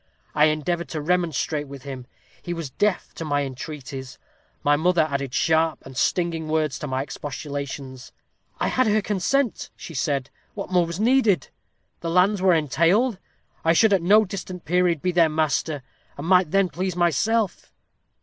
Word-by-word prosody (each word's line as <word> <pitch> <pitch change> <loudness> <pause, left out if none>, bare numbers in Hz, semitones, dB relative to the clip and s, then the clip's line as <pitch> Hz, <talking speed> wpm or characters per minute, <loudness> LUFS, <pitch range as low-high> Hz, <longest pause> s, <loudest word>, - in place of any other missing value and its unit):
I 150 0 +5
endeavored 155 +3 -1
to 155 - -3
remonstrate 155 -2 0
with 135 -2 -10
him. 130 -3 -7 0.3
He 175 - -4
was 165 -5 -5
deaf 205 +5 0
to - - -6
my 145 -2 0
entreaties. 135 -1 -7 0.5
My 145 0 +4
mother 170 +2 +3
added 140 -3 -3
sharp 160 +3 +1
and 130 - -11
stinging 165 +2 0
words 155 -3 0
to 150 - -5
my 130 0 -1
expostulations. 140 -2 -6 0.5
'I - - +1
had 255 -2 +2
her 215 0 +2
consent,' 215 +6 0
she 165 - -9
said; 140 -1 -1 0.2
'what - - -6
more 175 -2 +3
was 170 +2 -5
needed? 225 -4 +3 0.5
The 165 - -4
lands 185 +3 +3
were 185 -2 +5
entailed. 170 - +2 0.4
I 165 - +4
should 215 +4 +4
at 190 - +3
no 210 +5 +5
distant 185 -2 -7
period 175 -2 +1
be 180 - +2
their 170 -2 +4
master, 155 -2 0 0.3
and 140 - -6
might 180 -1 +4
then 195 +1 +2
please 180 +3 -3
myself.' 180 +5 0
165 Hz, 165 wpm, -24 LUFS, 145-180 Hz, 0.5 s, I